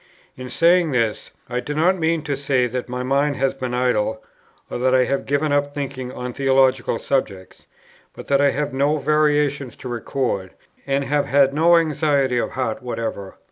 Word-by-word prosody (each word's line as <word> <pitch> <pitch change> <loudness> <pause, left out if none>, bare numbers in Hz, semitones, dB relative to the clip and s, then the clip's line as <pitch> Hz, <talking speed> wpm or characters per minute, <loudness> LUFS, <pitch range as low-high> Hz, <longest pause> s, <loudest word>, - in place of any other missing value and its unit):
In 130 0 -8
saying 170 +5 +3
this, 115 -4 -1 0.2
I 125 0 -2
do 145 +4 -5
not 175 +5 +3
mean 165 -2 0
to 145 -2 -2
say 135 -2 +1
that 125 +1 -4
my 125 0 -3
mind 140 +2 +1
has 135 0 0
been 130 -2 -4
idle, 110 -3 0 0.4
or - - -5
that 130 +1 +2
I 130 - +5
have 135 +2 -2
given 145 +2 0
up 145 0 0
thinking 135 -3 -5
on 125 -1 -6
theological 130 -3 +2
subjects; 100 -10 -3 0.5
but - - -9
that 140 0 +2
I 140 - +4
have 145 +2 -2
had - - -15
no 140 +3 +1
variations 145 -3 +1
to - - -9
record, 120 -5 -3 0.3
and 140 0 +1
have 145 +1 0
had 140 -1 +3
no 170 +3 +5
anxiety 145 -5 +1
of - - -3
heart 130 -1 -2
whatever. 115 -5 -5
135 Hz, 185 wpm, -21 LUFS, 125-145 Hz, 0.5 s, I